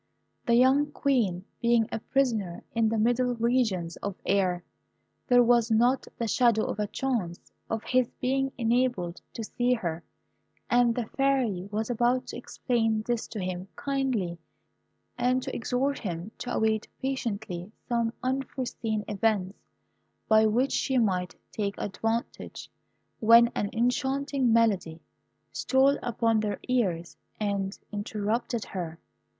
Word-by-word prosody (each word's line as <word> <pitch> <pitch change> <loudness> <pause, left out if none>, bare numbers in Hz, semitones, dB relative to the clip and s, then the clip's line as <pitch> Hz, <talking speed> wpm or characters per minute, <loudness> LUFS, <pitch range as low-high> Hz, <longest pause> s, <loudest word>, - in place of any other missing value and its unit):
The 235 - +5
young 265 +4 +5
Queen 215 -10 0 0.2
being 235 -2 +3
a - - -2
prisoner 225 -9 0
in 230 -1 +2
the 225 - 0
middle 245 +3 +2
regions 225 -8 0
of 200 -2 -4
air, 185 -3 +1 0.6
there 245 -1 +6
was 235 -1 +4
not 240 +4 +3
the 230 - -1
shadow 230 -2 +3
of - - -4
a 210 - 0
chance 215 -10 -3 0.2
of 225 -1 -2
his 255 -1 +2
being 270 +1 0
enabled 235 -7 0
to 230 - -5
see 245 +3 +1
her; 170 -6 -4 0.7
and 240 -1 +4
the 245 - -1
Fairy 245 -8 0
was 220 +3 -1
about 245 +2 +2
to - - -6
explain 225 -3 0
this 240 -2 -1
to 220 - -6
him 185 0 -4
kindly, 255 -11 -1 0.8
and 255 +1 +2
to - - -4
exhort 265 +4 0
him 180 0 -5
to 245 - -4
await 220 -1 +1
patiently 215 -8 -3 0.2
some 235 -1 +1
unforeseen 255 -4 -2
events, 205 -2 0 0.8
of 220 0 +6
which 255 +5 +2
she 265 -1 +1
might 185 -6 +1 0.2
take 200 -1 -2
advantage, 225 +3 -3 0.5
when 230 +1 +7
an 205 - -2
enchanting 265 +2 +1
melody 200 -8 +2 0.5
stole 270 +1 +3
upon 230 -1 +1
their 210 -1 -1
ears 185 -10 0 0.2
and 200 -2 -1
interrupted 215 +2 -2
her. 170 -4 -5
230 Hz, 135 wpm, -28 LUFS, 205-250 Hz, 0.8 s, when